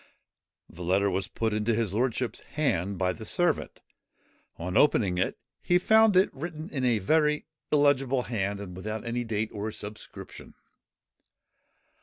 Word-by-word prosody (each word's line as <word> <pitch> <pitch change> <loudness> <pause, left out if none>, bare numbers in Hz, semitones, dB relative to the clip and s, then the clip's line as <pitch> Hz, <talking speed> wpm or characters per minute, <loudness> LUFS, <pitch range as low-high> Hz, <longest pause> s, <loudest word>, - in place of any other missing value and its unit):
The 85 - -12
letter 95 +3 +2
was 95 0 -1
put 110 -1 -2
into 110 +2 +1
his 110 -4 -1
lordship's 125 +2 -1
hand 100 - -1
by 90 0 +1
the 110 - -9
servant. 175 - -1 0.8
On 90 +2 -4
opening 100 -11 +3
it, - - 0 0.2
he 175 - +3
found 220 +1 +5
it 190 - +4
written 160 +2 -6
in 135 -4 -2
a 120 -3 +3
very 150 +8 +2 0.3
illegible 135 -3 +3
hand, 100 -4 -2
and 95 -3 -8
without 110 +4 -5
date 115 -2 -2
or 105 +1 -3
subscription. 105 0 -9
110 Hz, 140 wpm, -28 LUFS, 100-145 Hz, 0.8 s, found